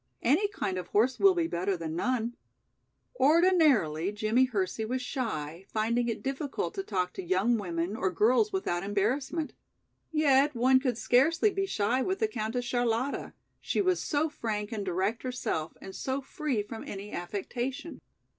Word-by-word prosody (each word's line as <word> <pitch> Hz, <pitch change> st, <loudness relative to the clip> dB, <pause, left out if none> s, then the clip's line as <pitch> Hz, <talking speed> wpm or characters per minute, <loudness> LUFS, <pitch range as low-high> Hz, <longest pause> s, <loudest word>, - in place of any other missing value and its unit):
Any 310 Hz, -, +3 dB
kind 190 Hz, -, -3 dB
of 180 Hz, -, -7 dB
horse 235 Hz, +7 st, +2 dB
will 390 Hz, -2 st, +6 dB
be 340 Hz, -2 st, +1 dB
better 190 Hz, -, -1 dB
than 160 Hz, -1 st, -4 dB
none." 240 Hz, +4 st, -1 dB, 0.8 s
Ordinarily, 285 Hz, -, +4 dB
Jimmie 215 Hz, +5 st, +2 dB
Hersey 215 Hz, -3 st, -2 dB
was 250 Hz, +4 st, -1 dB
shy, 190 Hz, -, -4 dB
finding 235 Hz, +2 st, +1 dB
it 225 Hz, -, -4 dB
difficult 275 Hz, +7 st, -3 dB
to 395 Hz, -, -3 dB
talk 180 Hz, -, -2 dB
to -, -, -5 dB
young 190 Hz, +7 st, +2 dB
women 175 Hz, 0 st, -2 dB
or 190 Hz, -, 0 dB
girls 245 Hz, -, +3 dB
without 275 Hz, -, -1 dB
embarrassment. 255 Hz, -, -1 dB, 0.6 s
Yet 290 Hz, -2 st, +3 dB
one 260 Hz, +2 st, +5 dB
could 255 Hz, -4 st, -1 dB
scarcely 320 Hz, -, +3 dB
be 390 Hz, 0 st, -1 dB
shy 235 Hz, -, +1 dB
with 375 Hz, +8 st, 0 dB
the 440 Hz, -, +1 dB
Countess 245 Hz, -, -3 dB
Charlotta, 245 Hz, +2 st, -1 dB, 0.3 s
she -, -, -1 dB
was 370 Hz, -3 st, +2 dB
so 300 Hz, +1 st, +1 dB
frank 215 Hz, -7 st, -4 dB
and 215 Hz, -3 st, -3 dB
direct 190 Hz, +4 st, -1 dB
herself 245 Hz, -11 st, -3 dB
and 190 Hz, -, -9 dB
so 265 Hz, +1 st, -2 dB
free 270 Hz, -4 st, -2 dB
from 220 Hz, +2 st, -8 dB
any 200 Hz, +1 st, -7 dB
affectation. 240 Hz, -, -4 dB
240 Hz, 160 wpm, -29 LUFS, 200-285 Hz, 0.8 s, will